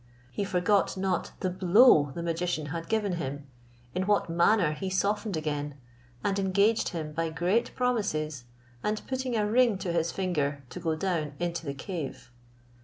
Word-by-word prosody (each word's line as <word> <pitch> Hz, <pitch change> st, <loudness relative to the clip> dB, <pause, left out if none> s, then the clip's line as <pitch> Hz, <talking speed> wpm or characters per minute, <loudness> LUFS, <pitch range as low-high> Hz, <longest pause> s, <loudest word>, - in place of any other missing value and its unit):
He 160 Hz, -, -2 dB
forgot 190 Hz, +2 st, +2 dB
not 185 Hz, -2 st, -1 dB
the 185 Hz, -, +1 dB
blow 185 Hz, -, +6 dB
the 170 Hz, -, -4 dB
magician 170 Hz, -1 st, -1 dB
had 165 Hz, +2 st, -5 dB
given 210 Hz, -5 st, 0 dB
him, 145 Hz, -2 st, -4 dB, 0.5 s
in 185 Hz, +1 st, -1 dB
what 205 Hz, -5 st, +2 dB
manner 170 Hz, 0 st, +4 dB
he 190 Hz, +5 st, -4 dB
softened 200 Hz, 0 st, 0 dB
again, 145 Hz, -2 st, -3 dB, 0.5 s
and 200 Hz, -1 st, +1 dB
engaged 200 Hz, +3 st, +2 dB
him 155 Hz, -4 st, -5 dB
by 165 Hz, +1 st, -1 dB
great 175 Hz, +9 st, 0 dB
promises, 155 Hz, -, -1 dB, 0.4 s
and 210 Hz, 0 st, 0 dB
putting 260 Hz, -2 st, -2 dB
a 210 Hz, -, +2 dB
ring 235 Hz, -1 st, +4 dB
to 180 Hz, -2 st, -3 dB
his 170 Hz, 0 st, +1 dB
finger, 150 Hz, -7 st, -1 dB
to -, -, -6 dB
go 160 Hz, -1 st, 0 dB
down 155 Hz, -4 st, -1 dB
into 170 Hz, -2 st, -3 dB
the 140 Hz, -, -3 dB
cave. 145 Hz, -3 st, -6 dB
180 Hz, 165 wpm, -28 LUFS, 155-205 Hz, 0.5 s, blow